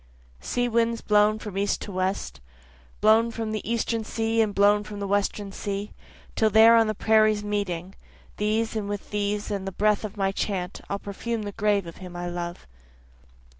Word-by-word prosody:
Sea 245 - -1
winds 230 0 +1
blown 210 0 +3
from 210 -3 -8
east 200 0 -1
and 200 - -8
west, 185 - -2 0.6
Blown 220 +2 +5
from 225 -1 -4
the 215 +1 -3
Eastern 230 -1 0
sea 225 +1 0
and 215 -2 +1
blown 205 +1 +4
from 210 -1 -8
the 200 - -3
Western 200 0 -1
sea, 200 +1 -4 0.4
till 220 - +3
there 220 +2 +7
on 225 -1 +5
the 215 - -1
prairies 215 0 +3
meeting, 195 -3 -3 0.4
These 220 +2 0
and 210 -2 -2
with 205 -1 -5
these 205 0 -1
and 195 -1 -3
the - - -2
breath 210 +2 +1
of 215 0 -6
my 195 -1 +1
chant, 190 -2 -3
I'll 200 - -1
perfume 215 +3 -4
the 205 - -4
grave 205 -1 +1
of 165 - -9
him 180 -1 -10
I 175 0 -4
love. 175 0 -5
210 Hz, 185 wpm, -25 LUFS, 195-220 Hz, 0.6 s, there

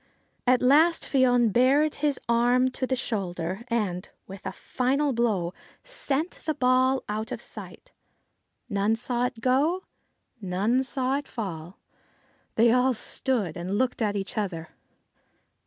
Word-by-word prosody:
At 255 0 +4
last 315 +6 +5
Fion 245 -5 +3
bared 275 +6 +4
his 290 -2 +1
arm 245 +2 +3
to 255 - -3
the 260 - +1
shoulder, 190 -5 -3
and, 205 -7 -2 0.2
with 195 0 -9
a - - -3
final 275 +3 0
blow, 210 -7 0 0.3
sent 330 - -2
the 310 -1 -4
ball 260 0 +3
out 215 +1 -4
of - - -4
sight. - - -9 0.8
None 205 0 +1
saw 245 +1 0
it 245 -3 -10
go; 290 +9 +2 0.6
none 200 +7 +1
saw 265 0 0
it 285 - -11
fall. 180 -5 -6 0.8
They 230 +1 +5
all 250 +1 +3
stood 220 -7 -1
and 185 +3 -3
looked 255 0 0
at 210 -2 +1
each 200 +2 -3
other. 170 -6 -4
245 Hz, 140 wpm, -26 LUFS, 205-265 Hz, 0.8 s, last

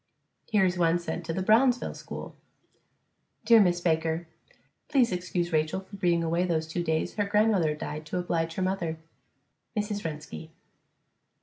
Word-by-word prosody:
Here 210 -4 +3
is 180 -1 0
one 170 0 +3
sent 170 -1 -5
to - - -1
the 190 +2 -2
Brownsville 245 +5 +3
school: - - -8 1.1
Dear 230 -1 +7
Miss 175 -3 +3
Baker: 160 0 0 0.6
Please 250 -5 +3
excuse 180 -1 -2
Rachael 155 +4 +1
for 195 +1 -12
being 175 -3 +1
away 170 +2 +1
those 165 -3 0
two 170 +2 -3
days 160 -1 -1
her 205 - +2
grandmother 200 -7 +2
died 150 0 -6
to 180 - -3
oblige 165 -2 -1
her 190 - -1
mother. 175 -4 -1 0.8
MRS. 210 -1 -2
RENSKI. 155 0 -6
175 Hz, 150 wpm, -28 LUFS, 165-195 Hz, 1.1 s, Dear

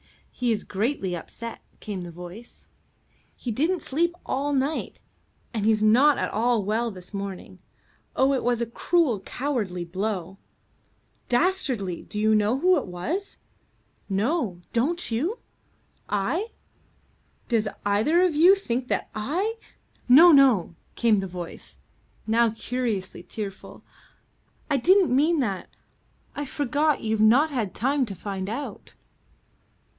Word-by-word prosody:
"He's 235 -4 -1
greatly 200 -3 -2
upset," 230 +7 -8 0.2
came 200 -3 -5
the 175 - -7
voice. 180 +7 -11 0.7
"He 245 - -5
didn't 320 - 0
sleep 340 +5 0
all 280 +2 -1
night, 275 +3 -1 0.5
and 220 -3 -2
he's 215 0 +3
not 260 +7 +5
at - - -2
all 230 0 +2
well 220 +4 0
this 185 -2 -12
morning. 195 -2 -6 0.6
Oh, 265 +1 +3
it 265 - -1
was 240 -1 +1
a 235 - 0
cruel, 255 - +1
cowardly 205 -7 -3
blow." 190 0 -4 0.9
"Dastardly. 245 - 0
Do 210 - -6
you 215 +1 +3
know 215 +3 +2
who 360 +5 +4
it 280 - -3
was?" 290 - -4 0.7
"No. 205 - -1
Don't 285 +5 +1
you?" 320 - -1 0.7
"I? 210 - 0 1.0
Does 225 -3 +1 0.2
either 225 - +3
of 360 -3 +2
you 345 +6 +7
think 250 -10 -3
that - - -2
I 355 - -2 0.2
?" - - -37
"No, 325 +8 +9
no," 260 - +5 0.2
came 225 -4 +3
the 195 - -3
voice, 175 -2 -9 0.5
now 230 +1 +3
curiously 225 -5 -3
tearful. 195 +1 -8 0.9
"I 280 - +3
didn't 360 +1 +4
mean 310 +4 +3
that. 200 -7 -3 0.7
I 290 - -3
forgot 290 +2 0
you've 220 -1 0
not 255 +9 +5
had 225 -9 -2
time 270 +1 +1
to 200 - -6
find 190 +1 -5
out." 260 +7 -6
235 Hz, 130 wpm, -25 LUFS, 200-290 Hz, 1.0 s, No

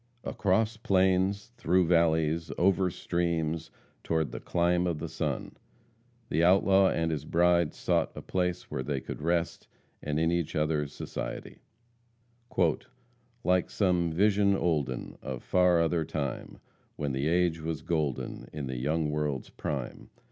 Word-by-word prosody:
Across 105 +3 +1
plains, 95 +1 +1
through 90 +2 +3
valleys, 80 -1 +2
over 95 0 +3
streams 85 -2 -1 0.3
toward 80 -2 0
"the - - -5
clime 90 +1 +1
of 85 -3 -1
the - - -4
sun," - - -3 0.7
the 85 - +1
outlaw 95 +1 +5
and 80 0 0
his 75 -3 -2
bride 85 0 +2
sought - - 0
a - - -6
place 90 -1 -2
where - - -2
they 70 +1 -2
could - - -7
rest, 85 +1 -1 0.3
and 75 +1 -1
in 80 +1 +2
each 85 -3 -1
other's 75 -2 0
society, - - -6 1.8
"Like 90 -1 +2
some 90 -4 +1
vision 100 +3 +3
olden 75 -9 -1
Of 65 -2 -6
far 90 -2 +3
other 85 0 +1
time, 70 -4 -4 0.4
When 75 -2 -2
the 65 +3 -1
age 85 -1 +2
was 80 -1 -4
golden, 75 -6 -2
In 75 -2 -5
the 65 -1 -4
young 75 +4 0
world's 75 -3 -2
prime. 70 -5 -5
85 Hz, 140 wpm, -29 LUFS, 75-90 Hz, 1.8 s, outlaw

